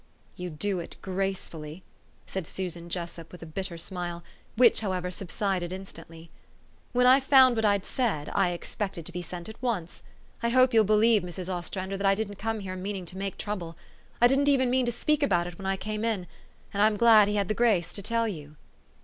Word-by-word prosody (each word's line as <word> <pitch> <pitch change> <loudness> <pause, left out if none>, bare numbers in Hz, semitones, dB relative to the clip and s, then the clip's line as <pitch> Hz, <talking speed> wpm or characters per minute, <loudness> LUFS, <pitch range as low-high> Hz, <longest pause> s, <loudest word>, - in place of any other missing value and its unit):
"You 180 0 -5
do 180 +4 -2
it 170 - -7
gracefully," 185 -4 -4 0.4
said 190 -4 -5
Susan 175 -2 -5
Jessup 170 -1 -5
with 180 - -10
a - - -7
bitter 170 +2 -4
smile, 175 -1 -4 0.3
which, 240 0 +6
however, 185 -3 -2
subsided 185 -1 -2
instantly. 165 -3 -10 0.6
"When 250 0 +3
I 255 +2 +7
found 265 -2 +6
what 225 -1 +1
I'd 200 -2 +2
said, 205 - -1
I 195 -2 +3
expected 175 0 -5
to - - -6
be 180 - -4
sent 175 0 -7
at 220 +2 -11
once. 210 -10 -3 0.4
I 235 - +1
hope 255 +1 +4
you'll 220 -1 +5
believe, 215 +1 +4
Mrs. 180 +1 -4
Ostrander, 185 +2 -4
that 200 0 0
I 195 - +4
didn't 205 -1 -4
come 225 0 -2
here 185 -1 -5
meaning 190 0 -4
to 180 +2 -5
make 195 0 -4
trouble. 175 -6 -5 0.4
I 240 - +6
didn't 275 +3 +3
even 260 -3 +3
mean 255 -1 +2
to - - +1
speak 300 +5 0
about 175 -3 +2
it 175 -1 -8
when 195 - -5
I 195 0 0
came 215 +2 -4
in; 220 -6 -1 0.5
and 200 - 0
I'm 210 0 +4
glad 220 -2 +7
he 210 - -1
had 200 -2 +1
the 215 - 0
grace 210 -7 +2
to 200 - -3
tell 230 +3 0
you." 150 -7 -7
195 Hz, 205 wpm, -28 LUFS, 175-220 Hz, 0.6 s, I